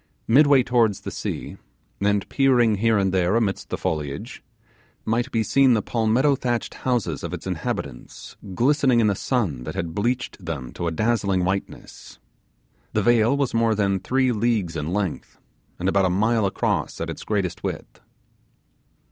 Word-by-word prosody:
Midway 140 +2 +5
towards 115 -5 +1
the - - -6
sea, - - -5 0.4
and 100 0 +1
peering 125 -6 +3
here 115 +1 +2
and 95 -2 +1
there 90 +2 +2
amidst 110 -4 -1
the - - -3
foliage, 75 -3 -4 0.6
might 120 +4 0
be 115 -1 +1
seen 135 +2 +4
the 105 - 0
palmetto 120 +5 +2
thatched 120 -2 -2
houses 125 -5 -2
of - - -3
its - - -10
inhabitants - - -5 0.2
glistening 130 0 +3
in 115 - +3
the 105 - +3
sun 95 - -1
that - - -6
had 85 -1 -3
bleached 120 0 -2
them 75 -7 -5
to 85 - -3
a - - 0
dazzling 100 -1 0
whiteness. 95 +1 -5 0.8
The - - +1
vale 120 +2 +3
was 140 -3 -1
more 115 -1 +2
than 100 -2 +1
three 130 +7 +1
leagues 110 -6 0
in 75 +1 -3
length, 95 -3 -3 0.4
and 90 - -2
about 95 0 +3
a - - +2
mile 110 +3 +2
across 95 - -2
at - - -3
its - - -8
greatest 95 -5 -2
width. - - -6
110 Hz, 165 wpm, -23 LUFS, 95-120 Hz, 0.8 s, Midway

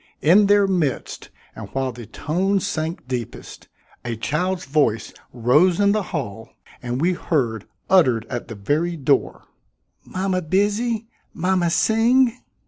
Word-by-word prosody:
In 195 +6 +6
their 205 0 +5
midst 175 -9 -2 0.3
and - - -8
while 135 -1 -1
the 120 -2 -10
tones 185 - -1
sank 155 -3 -3
deepest, 125 -3 -6 0.4
a 120 -1 -3
child's 175 +10 -2
voice 135 -6 0 0.2
rose 145 - +3
in 200 0 +4
the 215 +1 +1
hall 115 - -5 0.3
and 125 +1 -3
we 175 +4 +2
heard, 120 - -1 0.2
uttered 130 - +4
at 120 - -5
the 115 - -7
very 155 +11 -1
door: 140 -1 0 0.6
"Mama 185 0 -2
busy; 210 +6 0 0.3
mama 180 0 +1
sing." 230 +6 +3
165 Hz, 135 wpm, -22 LUFS, 125-195 Hz, 0.6 s, In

